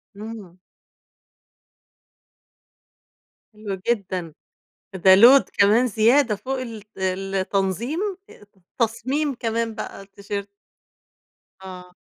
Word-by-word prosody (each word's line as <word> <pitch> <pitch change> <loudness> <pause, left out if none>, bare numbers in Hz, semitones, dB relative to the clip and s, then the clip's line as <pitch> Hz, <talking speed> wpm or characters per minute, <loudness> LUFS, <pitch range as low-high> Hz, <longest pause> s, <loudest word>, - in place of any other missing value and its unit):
امم. 205 -4 -9 3.0
حلو 210 -2 -5
جدًا، 190 -8 -2 0.6
ده 190 0 +6
load 245 +7 +7
كمان 215 +5 +4
زيادة 230 +2 +3
فوق 265 +5 -4
الت 225 -5 -8
التنظيم 195 - -2 0.3
ات 205 - -17 0.3
تصميم 260 +6 -1
كمان 230 -1 -2
بقى 215 - -7
التيشيرت. 200 0 -7 1.1
آه. 180 -1 -11
210 Hz, 80 wpm, -22 LUFS, 195-235 Hz, 3.0 s, load